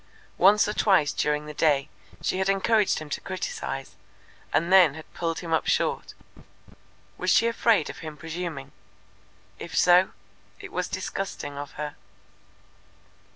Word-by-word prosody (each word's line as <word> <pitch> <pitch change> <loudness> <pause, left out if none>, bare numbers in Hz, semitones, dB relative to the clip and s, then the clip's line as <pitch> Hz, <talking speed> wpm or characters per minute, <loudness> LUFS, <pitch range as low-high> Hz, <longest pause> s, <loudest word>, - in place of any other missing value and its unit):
Once 205 +2 +5
or 210 - -2
twice 185 -10 +3
during 150 0 0
the 150 - -8
day 145 -2 +2 0.4
she 185 - 0
had 190 +1 +1
encouraged 205 +1 +2
him 155 - -6
to - - -4
criticize, 190 - -5 0.6
and 170 +3 +1
then 175 -7 +7
had 160 - -12
pulled 165 -1 -3
him 165 -2 -4
up 160 - +1
short. - - 0 1.0
Was - - -1
she - - +5
afraid 230 -2 +2
of - - -8
him 155 -2 -8
presuming? 160 -3 -6 0.9
If - - -6
so, 180 +1 +5 0.5
it - - -10
was 180 +1 -2
disgusting 190 -5 -5
of 145 0 -7
her. 150 0 -5
175 Hz, 145 wpm, -26 LUFS, 150-195 Hz, 1.0 s, then